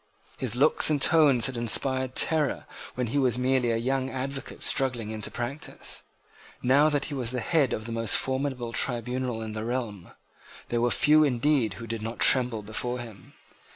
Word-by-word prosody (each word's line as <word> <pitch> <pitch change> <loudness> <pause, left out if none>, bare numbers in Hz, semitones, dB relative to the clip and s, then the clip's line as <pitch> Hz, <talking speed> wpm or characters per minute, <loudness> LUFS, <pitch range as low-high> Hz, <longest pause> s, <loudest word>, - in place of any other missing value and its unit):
His 125 -4 -1
looks 145 +5 +3
and 150 -2 +1
tones 145 -6 +4
had 130 - -2
inspired 130 +2 +1
terror 155 -3 +2 0.3
when 125 - -1
he 120 +5 -1
was 125 -3 +2
merely 125 -1 +1
a 115 - +1
young 130 +3 -1
advocate 135 +1 -6
struggling 120 -5 +1
into 110 -2 -3
practice. 125 +5 -5 0.6
Now 140 +5 +4
that 145 -1 -1
he 150 - -6
was 130 -2 -2
at - - -1
the 115 - -5
head 150 -7 +3
of 110 - -4
the 115 - -6
most 115 -3 +2
formidable 130 -3 -2
tribunal 125 -1 -1
in 110 - -6
the 110 0 -5
realm, 115 -6 -4 0.6
there 120 -1 0
were 120 - +2
few 155 +4 +4
indeed 125 -5 +1
who 115 - -8
did 115 -1 -5
not 115 +2 -5
tremble 125 -4 +3
before 120 +4 -3
him. 115 -5 -11
125 Hz, 185 wpm, -26 LUFS, 115-135 Hz, 0.6 s, tones